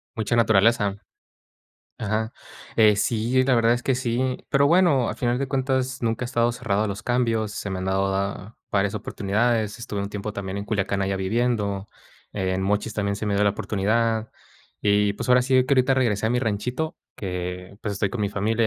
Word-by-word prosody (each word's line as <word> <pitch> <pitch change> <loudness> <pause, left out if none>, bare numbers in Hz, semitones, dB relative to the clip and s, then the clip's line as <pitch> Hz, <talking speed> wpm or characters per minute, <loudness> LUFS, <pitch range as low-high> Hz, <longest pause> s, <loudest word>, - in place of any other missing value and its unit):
¿Mucha 110 0 0
naturaleza? 110 -2 +3 1.0
Ajá, 110 +1 -1 0.5
eh, 110 -2 +6
sí, 115 +5 +1
la 130 -1 +3
verdad 115 0 +4
es 120 0 -3
que 135 - +2
sí, 125 0 -1
pero, 140 +1 +4
bueno, 160 -7 +4
al - - -4
final 120 0 0
de 140 - -1
cuentas, 130 -1 -1
nunca 115 +1 -1
he - - -1
estado 120 -2 +2
cerrado 110 -4 0
a - - -1
los 100 +1 -5
cambios, 115 -3 0
se 105 - -5
me 95 -1 -3
han 95 - -4
dado 95 +1 +1
da 100 +2 -3
varias 100 0 +1
oportunidades. 110 +2 0
Estuve 105 -3 -4
un 100 - -2
tiempo, 105 +1 -4
también, 100 -1 -5
en 100 - -3
Culiacán 100 -1 -1
allá 95 0 0
viviendo, 100 -1 -1 0.4
en 95 -1 -1
Mochis 105 +3 0
también 100 -1 -1
se 110 - -4
me 105 -1 0
dio 100 - +3
la 100 - +4
oportunidad, 110 +3 0 0.5
y 105 0 +3
pues, 100 - -5
ahora 125 0 +5
sí 130 +1 +1
que 140 - +3
ahorita 130 0 +3
regresé 115 -6 +1
a - - +2
mi 125 +1 +1
ranchito, 125 +7 -2 0.2
que, 90 0 -5
pues, 110 - -2
estoy 100 +1 0
con 110 +2 -4
mi 100 - 0
familia 110 +3 0
110 Hz, 200 wpm, -24 LUFS, 100-120 Hz, 1.0 s, eh